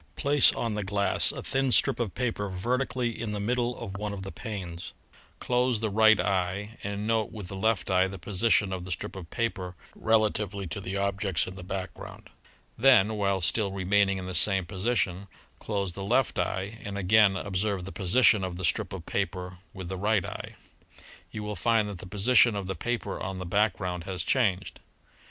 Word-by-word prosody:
Place 145 -1 +5
on 115 -2 -2
the 105 0 -2
glass 100 +1 +2
a - - -7
thin 135 -1 0
strip 120 - +3
of 115 -6 -2
paper 115 -5 -2
vertically 120 +5 -1
in 110 -2 -3
the 105 - -3
middle 120 +3 -1
of 100 -5 -6
one 105 0 -3
of 95 -1 -6
the 95 - -6
panes. 95 -7 -7 0.5
Close 125 -2 +1
the 110 -1 -2
right 110 +1 +5
eye 100 +4 -1
and 100 +1 -3
note 110 -1 0
with 105 -5 -8
the 95 - -6
left 100 -1 0
eye 95 0 +4
the 95 +1 -7
position 100 +2 +2
of 90 -1 -4
the 90 - -7
strip 85 - -4
of 90 -4 -8
paper 95 -6 -3 0.2
rela 110 -1 +3
tively 100 -2 -4
to 100 - -5
the 95 +1 -4
objects 100 - 0
in 90 - -7
the 95 - -9
background. 95 0 -7 0.5
Then, 115 -5 +5
while 100 -2 0
still 100 +4 +1
remaining 100 +1 +2
in 95 - -5
the 95 - -5
same 95 +1 +4
position, 100 -1 -1 0.3
close 100 -4 -2
the 100 - -6
left 120 +5 +1
eye 100 +4 -2
and 100 0 -5
again 100 +1 +4
observe 100 -1 -2
the 95 - -7
position 105 +1 +4
of 90 -1 -3
the 95 - -2
strip - - 0
of - - -7
paper 90 -1 -3
with 95 -2 -8
the 95 +1 -4
right 105 -1 +1
eye. - - -7 0.7
You 110 - -6
will 105 0 -4
find 115 -2 +2
that 100 -4 -7
the 95 - -9
position 110 +3 +4
of 100 -2 -3
the 95 - -3
paper 120 +7 -3
on 95 -2 -4
the 90 - -5
background 90 -2 0
has 90 -3 -3
changed. 100 -8 0
100 Hz, 195 wpm, -28 LUFS, 95-110 Hz, 0.7 s, Place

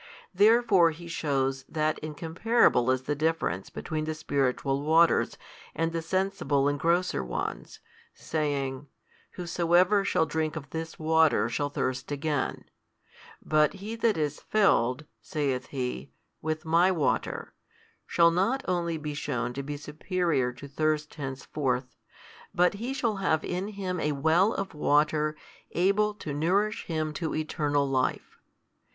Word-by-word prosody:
Therefore 205 -3 +5
He 165 +2 -9
shews 135 -4 -1
that 155 -1 0
incomparable 160 - +2
is 130 0 +1
the 145 - -1
difference 155 - -1
between 155 -2 -4
the 155 0 -3
spiritual 140 -2 0
waters, 160 +3 +3 0.4
and 165 0 0
the 165 0 -2
sensible 165 -6 0
and 145 0 0
grosser 170 - +1
ones, 60 -1 -5 0.3
saying, 145 -3 -3 0.5
Whosoever 180 +3 +2
shall 180 -4 +2
drink 160 -1 -2
of 145 -3 -7
this 160 0 -5
water 160 0 +3
shall 145 -1 -1
thirst 130 -1 -3
again, 145 -1 -2 0.8
but 155 -1 +3
he 205 +3 -6
that 230 -3 +1
is 150 -2 -1
filled 150 - +2 0.2
(saith 135 -4 -2
He) 125 - -4 0.3
with 155 +1 -3
My 170 +4 +4
water, 165 -6 -1 0.5
shall 170 -1 +4
not 210 +10 +1
only 170 -3 0
be 150 -1 -5
shewn 125 -5 -3
to 140 - -4
be 145 +1 -5
superior 150 -3 -1
to 125 +3 -11
thirst 155 +1 -1
henceforth, 130 -2 -3 0.6
but 180 +1 +4
he 230 +6 -4
shall 230 -6 0
have 160 -5 +1
in 180 +2 -2
him 190 -4 -4
a 150 - 0
well 160 +8 +3
of 195 0 -4
water 150 0 +2 0.4
able 200 +4 +2
to 155 -7 -6
nourish 195 +8 0
him 155 -2 -2
to 160 0 -3
eternal 150 -2 0
life. 130 -1 -1
155 Hz, 135 wpm, -28 LUFS, 145-180 Hz, 0.8 s, Therefore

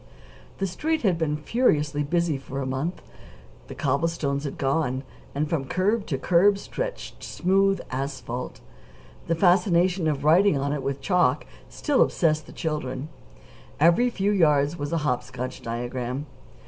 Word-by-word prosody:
The 195 - -1
Street 310 - -1
had 185 -6 +2
been 150 -2 0
furiously 150 - +1
busy 170 +1 +1
for 135 0 -6
a 135 - -2
month. 135 +7 -3 0.6
The - - -8
cobblestones 140 0 -1
had 140 - -5
gone, 135 -1 0 0.3
and 150 +2 0
from 145 -4 -1
curb 200 - 0
to 135 - -1
curb 190 +7 +4
stretched - - -6
smooth 195 +2 +2
asphalt. 130 -2 -4 0.7
The 165 - +1
fascination 180 -1 +3
of 145 -2 -1
writing 170 +2 +5
on 140 +1 -1
it 145 - -2
with 135 +1 -3
chalk 180 -2 +2 0.2
still 290 -3 +1
obsessed 155 -2 +2
the - - -11
children. 150 -3 -3 0.7
Every 175 +11 +5
few 205 -3 0
yards 150 -5 +3
was 145 -3 -4
a 165 - +1
hop 125 -3 +1
scotch 125 0 -6
diagram. 120 +3 -4
155 Hz, 150 wpm, -25 LUFS, 135-180 Hz, 0.7 s, writing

